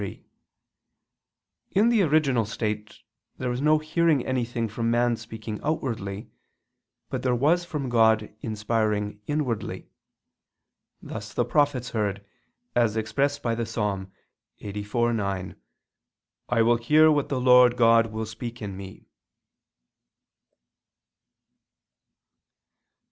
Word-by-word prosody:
3: 100 Hz, -, -7 dB, 1.5 s
In 215 Hz, +4 st, +4 dB
the 230 Hz, -3 st, +3 dB
original 145 Hz, -8 st, +3 dB
state 105 Hz, 0 st, -4 dB, 0.4 s
there 125 Hz, -1 st, -2 dB
was 125 Hz, +2 st, -3 dB
no 155 Hz, +1 st, +4 dB
hearing 155 Hz, -2 st, +1 dB
anything 120 Hz, -2 st, -1 dB
from 115 Hz, +2 st, -2 dB
man 120 Hz, 0 st, +2 dB
speaking 110 Hz, -1 st, -7 dB
outwardly, 110 Hz, -9 st, -3 dB, 0.8 s
but -, -, -2 dB
there 125 Hz, -1 st, +1 dB
was 160 Hz, +8 st, +2 dB
from 150 Hz, -6 st, -4 dB
God 110 Hz, -3 st, +3 dB
inspiring 105 Hz, -1 st, -1 dB
inwardly: 145 Hz, -7 st, -3 dB, 1.1 s
thus -, -, -8 dB
the -, -, +1 dB
prophets 140 Hz, -5 st, +1 dB
heard, 100 Hz, -2 st, -2 dB, 0.5 s
as 115 Hz, -2 st, +2 dB
expressed 140 Hz, +6 st, -1 dB
by 115 Hz, -, 0 dB
the 115 Hz, +1 st, -2 dB
Ps. 115 Hz, -, -9 dB
84:9: 100 Hz, 0 st, -3 dB, 0.9 s
"I 120 Hz, -2 st, +2 dB
will 120 Hz, +1 st, +4 dB
hear 155 Hz, +6 st, +5 dB
what 145 Hz, -2 st, 0 dB
the 135 Hz, -, -1 dB
Lord 125 Hz, -1 st, +6 dB
God 115 Hz, -1 st, +5 dB
will 110 Hz, 0 st, -4 dB
speak 115 Hz, +2 st, -7 dB
in 100 Hz, -3 st, -6 dB
me." 95 Hz, 0 st, -10 dB
115 Hz, 110 wpm, -25 LUFS, 105-130 Hz, 1.5 s, Lord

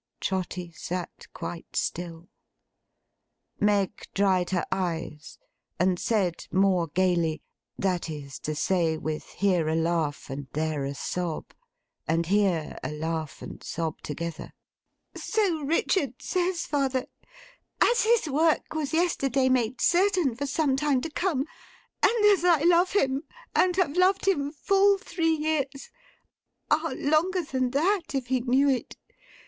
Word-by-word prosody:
Trotty 185 Hz, -2 st, -3 dB
sat 175 Hz, +1 st, -6 dB
quite 170 Hz, -, -7 dB
still. 170 Hz, -1 st, -3 dB, 1.3 s
Meg 205 Hz, -2 st, +1 dB
dried 190 Hz, -3 st, +2 dB
her 180 Hz, -2 st, 0 dB
eyes, 165 Hz, -5 st, -3 dB, 0.4 s
and 180 Hz, 0 st, +2 dB
said 190 Hz, -7 st, 0 dB
more 185 Hz, -3 st, +3 dB
gaily: 170 Hz, -2 st, +1 dB, 0.3 s
that 180 Hz, -3 st, -1 dB
is 145 Hz, -3 st, -7 dB
to 155 Hz, -, -3 dB
say, 165 Hz, 0 st, +1 dB
with 155 Hz, 0 st, -4 dB
here 180 Hz, -4 st, +1 dB
a 160 Hz, -, +1 dB
laugh, 165 Hz, -3 st, 0 dB
and 140 Hz, 0 st, -6 dB
there 155 Hz, -2 st, -1 dB
a 140 Hz, +1 st, -4 dB
sob, 175 Hz, +2 st, -3 dB, 0.6 s
and 165 Hz, +1 st, +1 dB
here 185 Hz, -4 st, +1 dB
a -, -, -2 dB
laugh 160 Hz, 0 st, -4 dB
and -, -, -9 dB
sob 160 Hz, -2 st, -4 dB
together: 165 Hz, +2 st, -6 dB, 0.6 s
'So 395 Hz, -8 st, 0 dB
Richard 285 Hz, -, 0 dB
says, 360 Hz, -2 st, -1 dB
father; 270 Hz, -3 st, 0 dB, 0.7 s
as 485 Hz, -, +4 dB
his 455 Hz, -5 st, +3 dB
work 310 Hz, +3 st, +1 dB
was 310 Hz, -1 st, -2 dB
yesterday 275 Hz, -6 st, +2 dB
made 250 Hz, -1 st, +1 dB
certain 360 Hz, -, +3 dB
for 280 Hz, +5 st, -4 dB
some 280 Hz, -1 st, +1 dB
time 275 Hz, -2 st, +1 dB
to 325 Hz, -, -5 dB
come, 300 Hz, -5 st, 0 dB, 0.6 s
and 455 Hz, -2 st, +4 dB
as 405 Hz, -4 st, +5 dB
I 340 Hz, -5 st, +4 dB
love 350 Hz, +2 st, +4 dB
him, 275 Hz, -8 st, +2 dB, 0.3 s
and 365 Hz, -1 st, +3 dB
have 350 Hz, -5 st, +1 dB
loved 375 Hz, +2 st, +3 dB
him 290 Hz, -7 st, +1 dB
full 395 Hz, +5 st, +3 dB
three 330 Hz, -3 st, 0 dB
years—ah! 310 Hz, -, -4 dB
longer 340 Hz, +5 st, +2 dB
than 260 Hz, -4 st, -1 dB
that, 330 Hz, +3 st, 0 dB
if 255 Hz, -2 st, -2 dB
he 260 Hz, -1 st, +2 dB
knew 260 Hz, +3 st, +3 dB
it! 265 Hz, -3 st, -1 dB
255 Hz, 135 wpm, -27 LUFS, -, 1.3 s, as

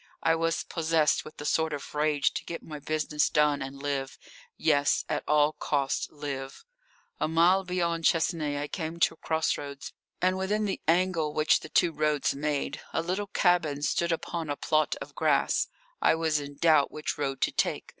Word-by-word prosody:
I 165 Hz, -, +4 dB
was 165 Hz, 0 st, 0 dB
possessed 160 Hz, -2 st, +1 dB
with 155 Hz, -, -12 dB
a -, -, -6 dB
sort 160 Hz, 0 st, +1 dB
of 145 Hz, -, -6 dB
rage 150 Hz, -1 st, +1 dB
to -, -, -4 dB
get 170 Hz, -, -7 dB
my 150 Hz, -2 st, -8 dB
business 150 Hz, 0 st, 0 dB
done 150 Hz, -1 st, +2 dB
and 135 Hz, +1 st, -6 dB
live 140 Hz, -2 st, -2 dB, 0.4 s
yes, 145 Hz, -2 st, +2 dB
at 145 Hz, -, -2 dB
all 150 Hz, 0 st, +4 dB
costs 140 Hz, -3 st, -1 dB
live. 140 Hz, -, -6 dB, 0.5 s
A -, -, +1 dB
mile 170 Hz, +4 st, +4 dB
beyond 170 Hz, -2 st, -1 dB
Chesnay 155 Hz, -3 st, +1 dB
I 145 Hz, -, -3 dB
came 165 Hz, +1 st, -5 dB
to -, -, +3 dB
cross 160 Hz, -1 st, 0 dB
roads, 140 Hz, -1 st, -8 dB, 0.3 s
and 185 Hz, +1 st, +1 dB
within 210 Hz, +3 st, 0 dB
the 195 Hz, -, -3 dB
angle 165 Hz, -3 st, +2 dB
which 155 Hz, 0 st, +4 dB
the 155 Hz, -, -10 dB
two 170 Hz, -, +3 dB
roads 150 Hz, -1 st, +1 dB
made 145 Hz, 0 st, -2 dB
a 165 Hz, -, 0 dB
little 190 Hz, +4 st, -2 dB
cabin 175 Hz, -7 st, +1 dB
stood 170 Hz, +3 st, +1 dB
upon 165 Hz, -1 st, -3 dB
a 145 Hz, -, -1 dB
plot 155 Hz, -2 st, +1 dB
of -, -, -9 dB
grass. -, -, +2 dB, 0.3 s
I -, -, +4 dB
was 160 Hz, -2 st, +1 dB
in 145 Hz, 0 st, -8 dB
doubt 155 Hz, -3 st, +4 dB
which 155 Hz, -1 st, -4 dB
road 135 Hz, -2 st, -2 dB
to -, -, +2 dB
take. -, -, -1 dB
155 Hz, 185 wpm, -28 LUFS, 145-165 Hz, 0.5 s, I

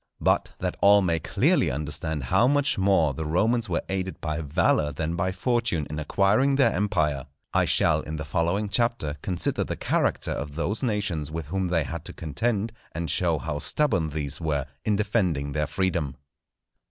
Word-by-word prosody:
But -, -, +1 dB
that -, -, -2 dB
all 100 Hz, +1 st, +6 dB
may 85 Hz, -2 st, +1 dB
clearly -, -, +2 dB
understand 75 Hz, +2 st, -2 dB
how 115 Hz, -, +3 dB
much 145 Hz, 0 st, +3 dB
more 95 Hz, -7 st, +3 dB
the 80 Hz, -, -4 dB
Romans 110 Hz, +8 st, +1 dB
were 85 Hz, -, -1 dB
aided 95 Hz, -1 st, -3 dB
by 80 Hz, 0 st, -3 dB
valour 75 Hz, 0 st, +1 dB
than 80 Hz, +4 st, -3 dB
by 90 Hz, +2 st, 0 dB
Fortune 115 Hz, -, 0 dB
in 75 Hz, -, -3 dB
acquiring 100 Hz, -, +2 dB
their 135 Hz, -5 st, +4 dB
empire, 80 Hz, -8 st, 0 dB, 0.3 s
I -, -, +3 dB
shall -, -, +3 dB
in 80 Hz, -, -6 dB
the 75 Hz, -1 st, -5 dB
following 85 Hz, +7 st, 0 dB
Chapter 100 Hz, -, 0 dB
consider 90 Hz, -3 st, -1 dB
the -, -, -4 dB
character -, -, 0 dB
of 70 Hz, 0 st, -4 dB
those 95 Hz, +6 st, -1 dB
nations 100 Hz, -, -1 dB
with 80 Hz, 0 st, -5 dB
whom 95 Hz, +4 st, -2 dB
they 85 Hz, -3 st, +1 dB
had 85 Hz, +2 st, -6 dB
to -, -, -6 dB
contend, 105 Hz, -, -2 dB, 0.2 s
and 85 Hz, -2 st, -2 dB
show -, -, +2 dB
how 75 Hz, -2 st, -4 dB
stubborn 95 Hz, -, +1 dB
these 75 Hz, 0 st, -3 dB
were 75 Hz, -4 st, -1 dB, 0.2 s
in 105 Hz, -, +1 dB
defending 95 Hz, -9 st, 0 dB
their 75 Hz, +1 st, -1 dB
freedom. 90 Hz, -7 st, -1 dB
85 Hz, 175 wpm, -26 LUFS, 75-100 Hz, 0.3 s, all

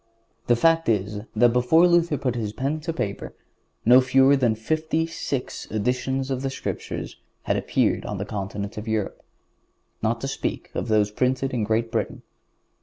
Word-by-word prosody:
The 120 Hz, -, +5 dB
fact 165 Hz, +3 st, +3 dB
is, 105 Hz, -1 st, 0 dB, 0.2 s
that 120 Hz, +2 st, +4 dB
before 125 Hz, +8 st, +5 dB
Luther 170 Hz, -3 st, +3 dB
put 130 Hz, -2 st, -1 dB
his 110 Hz, -4 st, -3 dB
pen 140 Hz, +6 st, -2 dB
to 165 Hz, +2 st, -3 dB
paper, 105 Hz, -11 st, -4 dB, 0.5 s
no 125 Hz, +3 st, +8 dB
fewer 135 Hz, +2 st, +5 dB
than 120 Hz, -5 st, +2 dB
fifty 155 Hz, +7 st, -1 dB
six 145 Hz, -5 st, -4 dB
editions 125 Hz, +5 st, -1 dB
of 130 Hz, -1 st, -1 dB
the 135 Hz, -, -1 dB
Scriptures 135 Hz, -, -5 dB, 0.3 s
had -, -, 0 dB
appeared -, -, +1 dB
on 105 Hz, -, -4 dB
the 100 Hz, -, -3 dB
continent 100 Hz, 0 st, -5 dB
of 105 Hz, -, -9 dB
Europe, 110 Hz, -2 st, -2 dB, 0.8 s
not 115 Hz, +1 st, 0 dB
to 135 Hz, -, -2 dB
speak 135 Hz, -, -4 dB
of -, -, -3 dB
those 105 Hz, -2 st, +2 dB
printed 130 Hz, +4 st, 0 dB
in 120 Hz, -3 st, 0 dB
Great 115 Hz, +2 st, 0 dB
Britain. -, -, -2 dB
125 Hz, 170 wpm, -24 LUFS, 110-135 Hz, 0.8 s, no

